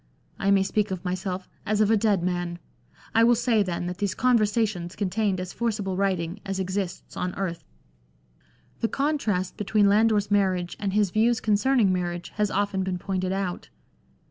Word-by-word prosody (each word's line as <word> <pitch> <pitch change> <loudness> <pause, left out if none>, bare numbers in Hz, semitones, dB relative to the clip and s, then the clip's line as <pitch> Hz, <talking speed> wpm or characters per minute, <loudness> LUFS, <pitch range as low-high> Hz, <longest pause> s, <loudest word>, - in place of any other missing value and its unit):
I 195 - +1
may 195 -1 +5
speak 210 +2 0
of 190 -1 -5
myself 185 0 -3 0.2
as 210 0 0
of 215 0 +4
a - - +6
dead 205 -4 +2
man. 175 -1 -2 0.6
I 225 - +5
will 240 +1 +6
say, 235 -2 +2
then, 175 -3 -2
that 180 0 -5
these 200 -2 -1
Conversations 215 -7 +1
contained 200 -1 0
as 185 0 -5
forcible 210 -5 -2
writing 190 -1 -1
as 195 -1 -3
exists 185 -1 -3
on 180 0 -3
earth." 180 -3 -3 1.2
The 230 - +1
contrast 225 -11 -1
between 210 0 +2
Lander's 210 0 +3
marriage 185 -3 +1
and 200 -2 -2
his 205 -3 +2
views 225 +3 +2
con 215 - +1
cerning 235 0 +3
marriage 175 -1 -2
has 210 -1 +2
often 200 -1 0
been 185 -1 -2
pointed 185 0 -2
out. 190 -2 -3
195 Hz, 170 wpm, -26 LUFS, 185-215 Hz, 1.2 s, a